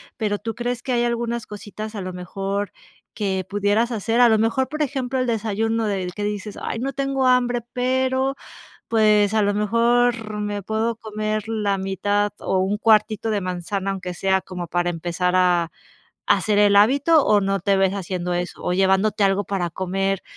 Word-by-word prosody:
pero, 205 -2 -1
¿tú 225 +1 -5
crees 240 +1 -3
que 265 - -3
hay 240 0 +2
algunas 235 -1 -2
cositas 215 +1 -8
a 205 - -4
lo 185 0 -5
mejor 195 +3 -4 0.4
que 190 -3 -1
pudieras 205 +4 +1
hacer, 230 +2 0
a 240 - +7
lo 220 - +4
mejor, 230 +4 +1
por 305 +1 -1
ejemplo, 265 -2 -2
el 255 - +1
desayuno 225 0 -1
del 185 -3 -2
que 205 +2 -5
dices: 210 0 -4
"Ay, - - -3
no 270 +2 -3
tengo 275 -1 -1
hambre, 245 -1 +2
pero, 260 +1 0 0.5
pues, 215 -2 +3
a 215 - +3
lo 205 - +1
mejor 230 +1 +1
me 205 -1 -3
puedo 220 +3 -1
comer 215 0 -3
la 210 -3 0
mitad, 205 +2 0
o 190 - -1
un 195 +2 0
cuartito 215 0 +3
de 210 -2 0
manzana", 185 +2 -3
aunque 185 -2 -5
sea 190 +1 +1
como 180 -1 -6
para 175 +1 0
empezar 175 +2 -1
a 175 -2 +3 0.6
hacer 210 -2 +2
el 205 -1 +5
hábito, 280 +9 +5
o 210 -1 +4
no 195 0 0
te 200 -1 +2
ves 190 0 +2
haciendo 180 -2 -3
eso. 175 +1 -4
O - - -1
llevándote 195 +2 +2
algo 195 +1 +2
para 180 -3 -2
comer, 190 +2 -2
210 Hz, 185 wpm, -22 LUFS, 195-230 Hz, 0.6 s, a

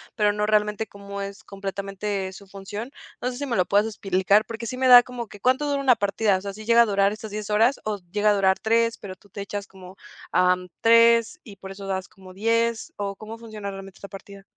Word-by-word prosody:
pero 210 -2 +2
no 210 0 -1
realmente 210 0 +1
como 200 0 -8
es 200 0 -7
completamente, 195 0 -4
su 200 +1 -13
función. 205 +6 -7 0.3
No 250 - -1
sé, 245 - -8
si 285 - -3
me 250 -4 -2
lo 180 - +3
puedas 205 +3 +3
explicar, 195 0 +1
porque 230 +1 -7
sí 255 - -5
me 260 0 +1
da 245 -1 +10
como 245 -2 -7
que 205 - -13
¿cuánto 260 +6 +1
dura 280 -1 0
una 260 -3 +5
partida? 205 -1 +1
O - - -8
sea, 200 0 -6
¿si 215 +1 -10
llega 235 +1 +6
a - - +1
durar 200 -1 +2
estas 215 0 -8
10 210 0 -5
horas, 225 +6 +3
o 210 -1 -1
llega 210 0 +2
a - - +5
durar 190 -1 +2
3, 230 +1 +1
pero 190 -2 -8
tú 200 +2 -24
te 200 - -7
echas 200 0 -5
como, 190 0 -14 0.3
am, 180 0 +2
3 230 +6 +5
y 205 -4 -12
por 190 +1 -9
eso 195 0 -9
das 190 -1 -3
como 185 -1 -15
10 230 +3 0
o 200 -1 -3
cómo 215 +3 -9
funciona 215 -3 -7
realmente 195 -1 -10
esta 200 - -10
partida? 195 0 -11
205 Hz, 240 wpm, -24 LUFS, 195-230 Hz, 0.3 s, da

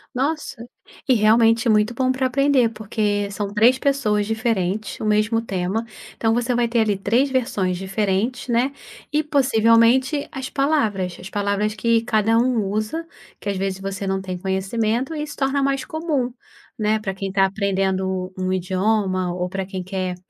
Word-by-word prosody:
Nossa, 275 -3 -2 0.4
e 260 - +5
realmente 225 +2 +4
é - - +5
muito 215 +2 +2
bom 255 +1 +1
pra 260 0 -1
aprender 265 -2 +3
porque 210 -2 -2
são 200 0 -4
3 235 +5 +5
pessoas 215 -8 +1
diferentes, 215 -3 -1
o - - -4
mesmo 215 +2 +2
tema, 195 +2 -2 0.3
então, 225 0 +1
você 240 +1 0
vai 240 -1 +2
ter 235 0 +1
ali 210 -3 +2
3 235 +8 +1
versões 200 -8 0
diferentes, 200 +6 -1
né, 245 +3 +1 0.4
e 305 +1 +2
possivelmente 260 0 +3
as 265 -1 -5
palavras. 220 - 0
As 185 +2 -9
palavras 205 +1 -1
que 230 -1 +2
cada 225 -1 +2
um 240 -3 +2
usa, 215 +12 -2 0.3
que 205 - -4
às 195 - -1
vezes 190 0 -2
você 195 0 -4
não 190 0 -1
tem 185 -1 -5
conhecimento 215 - -1
e 300 -1 -3
se 290 - -8
torna 275 +1 0
mais 275 -1 0
comum, 310 -7 -2 0.5
né 215 0 +1
pra 195 -2 -3
quem 195 0 -4
tá 195 0 +3
aprendendo 190 -2 -1
um 185 0 -1
idioma 185 0 0
ou 180 0 -3
pra 195 0 -3
quem 190 -1 -5
quer 185 -1 -3
215 Hz, 170 wpm, -22 LUFS, 195-245 Hz, 0.5 s, e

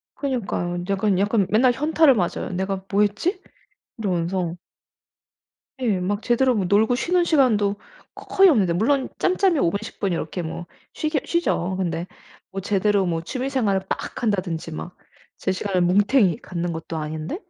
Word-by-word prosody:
그니까요. 190 -10 -2
약간 195 -1 +1
약간 205 0 +2
맨날 245 +4 +4
현타를 300 +2 +4
맞아요 180 -6 -2
'내가 190 0 -2
뭐 205 +1 +3
했지?' 210 - 0 0.6
이러면서. 180 -3 -1 1.2
예. 215 -7 +1
막 205 +4 -2
제대로 255 +1 +2
뭐 200 - 0
놀고 215 +6 +3
쉬는 355 +6 +1
시간도 225 -11 +3 0.4
거 - - -11
거의 390 0 +5
없는데 200 - +3
물론 255 +9 +1
짬짬이 370 -2 +2
5 170 - +3
분, 200 - -2
10 220 - -9
분 195 -3 0
이렇게 170 +2 -3
뭐 170 +1 -6 0.3
쉬기야 310 -2 -1
쉬죠. 240 - 0
근데 170 -2 -2 0.4
뭐 195 - -4
제대로 200 0 +1
뭐 165 -1 -1
취미 255 +9 -3
생활을 215 -8 +1
막 - - -4
한다든지 185 -7 -1
막 175 +3 -7 0.4
제 190 - 0
시간을 185 -1 -1
뭉탱이 200 - +3
갖는 175 -1 -3
것도 160 0 -6
아닌데 155 - -4
200 Hz, 315 characters per minute, -23 LUFS, 175-250 Hz, 1.2 s, 거의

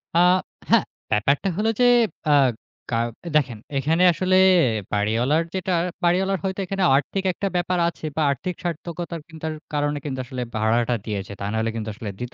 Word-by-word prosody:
আ - - +5 0.5
হ্যাঁ, - - +5 0.3
ব্যাপারটা 140 - +2
হলো 220 +1 +1
যে 245 - +5 0.5
আ - - +6 0.6
গা 115 - 0 0.4
দেখেন, 130 -7 +2 0.2
এখানে 160 +6 +2
আসলে 185 +2 +1 0.6
বাড়িওয়ালার 115 +10 +2
যেটা 185 0 -2 0.3
বাড়িওয়ালার 190 +2 +2
হয়তো 190 0 -2
এখানে 195 0 -2
আর্থিক 190 +7 -1
একটা 200 - -2
ব্যাপার 180 +1 0
আছে 160 - -10
বা 160 - 0
আর্থিক 180 +5 -3
সার্থকতার 170 0 -4
কিন্তু 160 0 -9 0.3
কারণে 145 0 0 0.3
আসলে 130 -2 -5
ভাড়াটা 115 +2 +1
দিয়েছে। 100 -2 -4
তা - - -5
নাহলে 110 +1 0
কিন্তু 110 -1 -4
আসলে 105 0 -6
দিত 125 0 -6
150 Hz, 155 wpm, -23 LUFS, 120-180 Hz, 0.6 s, আ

